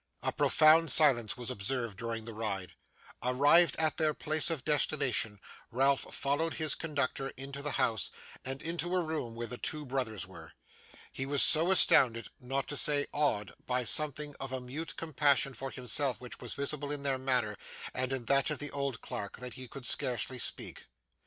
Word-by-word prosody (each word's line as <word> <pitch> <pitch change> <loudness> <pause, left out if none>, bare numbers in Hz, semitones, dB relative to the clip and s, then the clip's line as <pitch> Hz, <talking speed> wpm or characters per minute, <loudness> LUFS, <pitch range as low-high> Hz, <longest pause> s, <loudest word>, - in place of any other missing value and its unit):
A - - 0
profound 160 +1 +5
silence 130 -8 +3
was 120 -2 -5
observed 115 +1 -3
during 115 -1 -4
the 115 - -8
ride. 100 -4 -4 0.5
Arrived 145 +6 +4
at 160 -1 +1
their 155 -2 +1
place 155 0 +1
of 160 -6 -3
destination, 140 -8 0 0.3
Ralph 135 +3 +2
followed 145 +2 -1
his 155 -2 0
conductor 140 -3 -3
into 140 +1 -7
the 150 0 -2
house, 120 -5 0 0.3
and 135 +1 -5
into 175 +2 -2
a 180 - +1
room 155 -8 -4
where 120 0 -4
the 125 +1 -6
two 150 -1 -3
brothers 125 -7 -2
were. - - -13 0.6
He 135 - -5
was 140 -1 +4
so 165 +3 +6
astounded, 120 -10 +4
not 135 +2 -3
to 145 - -1
say 145 0 +5
awed, 105 - 0
by 125 0 0
something 150 +3 +1
of 135 -1 -5
a 130 - -3
mute 140 +6 -6
compassion 145 -4 +2
for 135 +1 -5
himself 130 +2 -1
which 125 -1 -8
was 120 - -4
visible 140 0 -4
in 145 -1 -2
their 135 -2 0
manner 125 -5 +1 0.4
and 130 +1 -1
in 130 -3 -3
that 140 +2 +3
of 150 - -2
the 145 - -3
old 140 -4 -3
clerk, 100 - -6
that 125 +1 -6
he 130 -1 -9
could 130 +1 -8
scarcely 125 +1 -1
speak. - - -4
135 Hz, 180 wpm, -31 LUFS, 125-150 Hz, 0.6 s, so